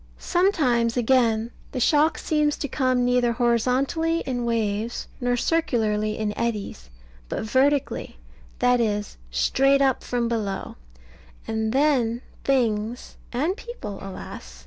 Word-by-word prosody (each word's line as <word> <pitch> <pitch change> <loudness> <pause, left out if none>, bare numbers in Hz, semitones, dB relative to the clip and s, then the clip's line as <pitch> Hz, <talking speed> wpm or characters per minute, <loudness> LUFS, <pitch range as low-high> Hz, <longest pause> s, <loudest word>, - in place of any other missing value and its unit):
Sometimes, 260 - +2
again, 235 -2 +2 0.2
the 255 - -2
shock 300 +4 +3
seems 300 -1 +1
to 285 - -3
come 255 -2 +1
neither 245 -1 +2
horizontally 255 +8 +1
in 245 -2 -3
waves, 225 0 -1
nor 245 0 0
circularly 220 -9 0
in 210 -1 -2
eddies, 205 - -3 0.4
but - - -3
vertically, 270 +5 +1 0.4
that 245 0 +3
is, 210 -2 -2
straight 270 - +3
up 270 -2 +2
from 240 -1 -1
below; 210 -4 -3 0.7
and 220 0 -1
then 255 -4 +2 0.2
things 235 -3 0 0.2
and 300 +10 0
people, 445 - -8
alas! 60 - -9
245 Hz, 120 wpm, -24 LUFS, 220-275 Hz, 0.7 s, shock